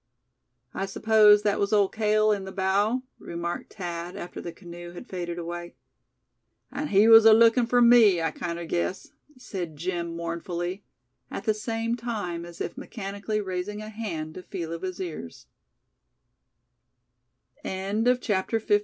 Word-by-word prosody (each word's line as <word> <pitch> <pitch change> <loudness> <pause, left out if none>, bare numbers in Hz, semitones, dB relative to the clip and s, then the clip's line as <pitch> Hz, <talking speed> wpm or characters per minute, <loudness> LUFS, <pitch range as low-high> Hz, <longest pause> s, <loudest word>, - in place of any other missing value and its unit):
"I 195 - -3
suppose 210 +1 +5
that 205 -1 +1
was 200 +1 0
Old 205 -2 +3
Cale 215 0 +3
in 200 -2 0
the 190 - -7
bow?" 200 +6 +1 0.2
remarked 170 0 -5
Thad, 175 -2 -5
after 175 - -7
the 170 - -6
canoe 175 -1 -10
had 175 - -9
faded 175 -2 -5
away. 175 0 -6 1.0
"An' 300 - -3
he 205 -1 +5
was 225 -1 +9
alookin' 230 +2 +6
fur 245 0 +4
me, 235 -6 +7
I 165 -1 0
kinder 170 +2 -5
guess," 175 +3 -2 0.3
said 180 -10 -6
Jim, 170 0 -3
mournfully; 170 +3 -4 0.5
at - - -5
the 215 - +2
same 225 +2 -2
time, 205 -8 -4
as 175 -1 -12
if - - -4
mechanically 205 0 -4
raising 190 +2 -4
a 215 - -7
hand 175 -8 -5
to 185 - -8
feel 170 -3 -5
of 165 - -6
his 185 -1 -5
ears. 155 - -7 2.2
CHAPTER 210 +2 0
XVI. 205 -1 +3
195 Hz, 145 wpm, -26 LUFS, 175-215 Hz, 2.2 s, was